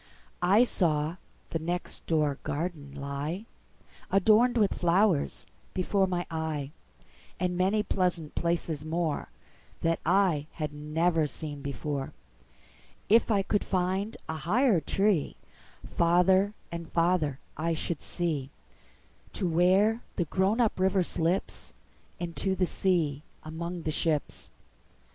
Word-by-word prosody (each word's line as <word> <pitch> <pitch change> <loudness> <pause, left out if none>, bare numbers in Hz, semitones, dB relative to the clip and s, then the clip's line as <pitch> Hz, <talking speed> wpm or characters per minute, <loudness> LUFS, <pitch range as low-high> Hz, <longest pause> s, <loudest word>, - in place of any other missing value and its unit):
I 195 +6 +5
saw 160 -7 +1 0.3
the 165 - -1
next 175 +3 -3
door 150 -4 +1
garden 145 -3 -4
lie, 145 +8 -4 0.6
Adorned 220 +5 +4
with 210 -3 +3
flowers, 175 -2 +2 0.3
before 190 +1 +2
my 175 -1 -2
eye, 155 -3 -3 0.7
And 180 0 0
many 195 +4 +2
pleasant 180 -6 -1
places 170 -3 -1
moreThat 165 0 -3
I 175 -4 +2
had 150 -2 -4
never 155 +2 +1
seen 145 +1 -6
before. 140 0 -4 1.0
If 230 +3 +5
I 200 -3 +3
could 205 +1 0
find 190 +3 -1
a 160 - -3
higher 200 - +2
treeFarther 185 +1 +1 0.2
and 170 -1 -6
farther 165 -5 +1 0.2
I 165 +2 -1
should 160 0 -3
see, 155 -7 -2 0.8
To 190 - -1
where 190 +7 +3
the 175 - 0
grown 190 +8 +1
up 225 -5 +2
river 190 0 +3
slipsInto 175 +1 -3
the 185 - +3
sea 165 -7 0 0.2
among 170 +2 -5
the 155 - -1
ships. 155 -1 -1
170 Hz, 110 wpm, -29 LUFS, 155-190 Hz, 1.0 s, I